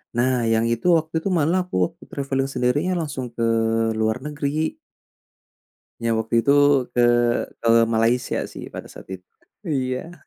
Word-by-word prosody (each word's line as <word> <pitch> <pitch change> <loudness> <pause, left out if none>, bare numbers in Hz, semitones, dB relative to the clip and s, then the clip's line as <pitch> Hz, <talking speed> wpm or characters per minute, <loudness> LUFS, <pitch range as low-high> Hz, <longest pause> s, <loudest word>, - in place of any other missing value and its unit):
Nah 125 0 +1
yang 115 +1 +2
itu 115 +6 -2
waktu 160 +1 -9
itu 195 - -1
malah 175 +2 +2
aku 180 - -8
waktu - - -18
traveling 135 -1 -2
sendirinya 140 +9 0
langsung 140 -4 -4
ke 115 - -2 0.6
luar 110 +1 +1
negeri. 150 +1 -2 1.2
Yang 115 -1 0
waktu 110 +1 -4
itu 140 - +4 0.4
ke 120 - +2 0.6
ke 115 - -1 0.2
Malaysia 115 +2 +1
sih - - -8
pada - - -9
saat - - -13
itu 90 - -27 0.4
iya. 135 0 -2
130 Hz, 145 wpm, -22 LUFS, 115-150 Hz, 1.2 s, itu